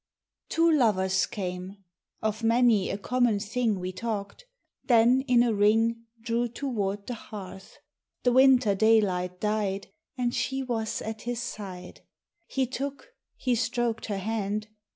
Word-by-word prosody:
Two 330 Hz, 0 st, +3 dB
lovers 190 Hz, -9 st, +2 dB
came; 185 Hz, 0 st, -5 dB, 0.5 s
of 215 Hz, +1 st, -1 dB
many 230 Hz, -3 st, +3 dB
a -, -, -2 dB
common 240 Hz, 0 st, +1 dB
thing 220 Hz, -1 st, -1 dB
We 180 Hz, 0 st, -4 dB
talked; 215 Hz, -, -5 dB, 0.4 s
then 245 Hz, +1 st, +5 dB
in 245 Hz, -2 st, +5 dB
a 235 Hz, -2 st, +1 dB
ring 225 Hz, +3 st, +2 dB
Drew 235 Hz, +1 st, -1 dB
toward 210 Hz, -6 st, -3 dB
the 250 Hz, -, -4 dB
hearth; 195 Hz, -4 st, -10 dB, 0.5 s
the 245 Hz, -, +4 dB
winter 255 Hz, -4 st, +5 dB
daylight 190 Hz, -4 st, +2 dB
died, 210 Hz, -2 st, -1 dB, 0.3 s
And 245 Hz, -1 st, 0 dB
she 265 Hz, +3 st, -1 dB
was 225 Hz, -4 st, -2 dB
at 220 Hz, 0 st, -5 dB
his 240 Hz, -1 st, -3 dB
side; 185 Hz, -5 st, -8 dB, 0.5 s
He 265 Hz, -1 st, 0 dB
took, 275 Hz, -, -5 dB, 0.3 s
he 255 Hz, -, 0 dB
stroked 240 Hz, -1 st, -1 dB
her 205 Hz, -2 st, -2 dB
hand. 210 Hz, +1 st, -2 dB
225 Hz, 135 wpm, -27 LUFS, 200-245 Hz, 0.5 s, then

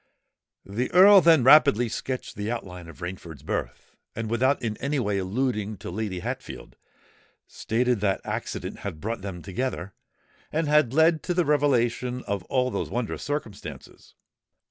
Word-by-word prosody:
The 110 Hz, +6 st, -3 dB
Earl 195 Hz, +2 st, +8 dB
then 160 Hz, -6 st, +5 dB
rapidly 125 Hz, -4 st, +6 dB
sketched 130 Hz, +3 st, -5 dB
the 105 Hz, +1 st, -4 dB
outline 90 Hz, -7 st, -6 dB
of 85 Hz, -, -14 dB
Rainford's 85 Hz, -5 st, -7 dB
birth; -, -, -5 dB, 0.2 s
and, 115 Hz, -1 st, -4 dB
without 130 Hz, +4 st, +2 dB
in 110 Hz, -2 st, -3 dB
any 140 Hz, +2 st, -2 dB
way 105 Hz, -6 st, 0 dB
alluding 105 Hz, +1 st, -2 dB
to -, -, -7 dB
Lady 95 Hz, -2 st, -4 dB
Hatfield, -, -, -7 dB, 0.7 s
stated 120 Hz, +1 st, -1 dB
that 95 Hz, -1 st, +1 dB
accident -, -, -4 dB
had 80 Hz, -, -6 dB
brought 110 Hz, +5 st, -4 dB
them 95 Hz, -3 st, -7 dB
together, 95 Hz, -2 st, -4 dB, 0.6 s
and 160 Hz, 0 st, 0 dB
had 150 Hz, -5 st, +3 dB
led 160 Hz, +2 st, +4 dB
to 180 Hz, -, -2 dB
the 175 Hz, -1 st, +2 dB
revelation 125 Hz, -4 st, +1 dB
of 100 Hz, -1 st, -3 dB
all 130 Hz, -1 st, 0 dB
those -, -, -3 dB
wondrous 120 Hz, -2 st, -3 dB
circumstances. 145 Hz, -9 st, -7 dB
120 Hz, 150 wpm, -26 LUFS, 100-140 Hz, 0.7 s, Earl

